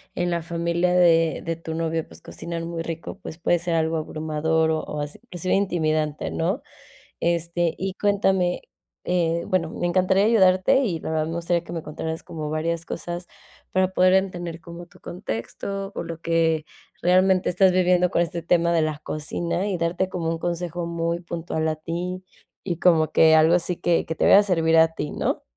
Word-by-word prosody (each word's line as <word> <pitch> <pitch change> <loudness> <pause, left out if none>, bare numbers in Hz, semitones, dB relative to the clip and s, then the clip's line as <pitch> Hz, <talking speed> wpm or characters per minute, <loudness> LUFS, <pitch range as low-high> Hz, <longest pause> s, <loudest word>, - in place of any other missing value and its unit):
en 175 0 0
la 170 -1 0
familia 170 +1 0
de 165 -2 +4
de 165 0 -2
tu 165 -1 -6
novio, 165 0 -2
pues - - -15
cocinan 165 0 -6
muy 165 -1 -4
rico, 165 +4 -6
pues 160 - -8
puede 175 +1 +2
ser 170 0 -2
algo 160 0 +1
abrumador 160 +1 0
o 150 -1 -3
así, 145 0 -6
inclusive 185 -5 -2
intimidante, 155 -6 0
¿no? 185 - -1 0.6
Este, 170 0 0
y 190 0 -2
cuéntame, 195 -3 +1 0.4
eh, 170 -1 +1
bueno, 165 -3 0
me 175 - -2
encantaría 190 +3 +3
ayudarte 205 +4 +4
y 175 -8 -1
la - - -5
verdad 155 0 0
me 165 - -4
gustaría 170 0 0
que 170 - -8
me 165 - -3
contaras 160 +2 -5
como 155 -2 -6
varias 165 +1 -2
cosas 175 +1 -5 0.5
para 185 0 +3
poder 185 0 +3
entender 175 -3 -1
como 170 +1 -10
tu - - -21
contexto 195 - -5
o - - -3
lo 165 -1 -7
que 165 -2 +1 0.4
realmente 185 +1 +3
estás 185 +1 +4
viviendo 180 -1 +3
con - - +2
este 170 0 -2
tema 170 0 +2
de 165 - +3
la 155 -1 -1
cocina 170 +5 -3
y 190 -3 -1
darte 175 +3 -1
como 170 -3 -2
un 165 0 -2
consejo 175 0 -3
muy 170 0 -2
puntual 165 -2 -3
a 155 - 0
ti 175 +4 -5 0.4
y 175 -3 -3
como 160 -3 +4
que 160 0 +6
algo 160 +2 +5
así 175 0 -1
que 170 -1 +1
que 160 - -4
te - - +1
vaya 200 - +8
a - - +4
servir 165 -4 +2
a 160 0 +5
ti, 150 -2 -4
¿no? - - -2
170 Hz, 190 wpm, -24 LUFS, 160-180 Hz, 0.6 s, vaya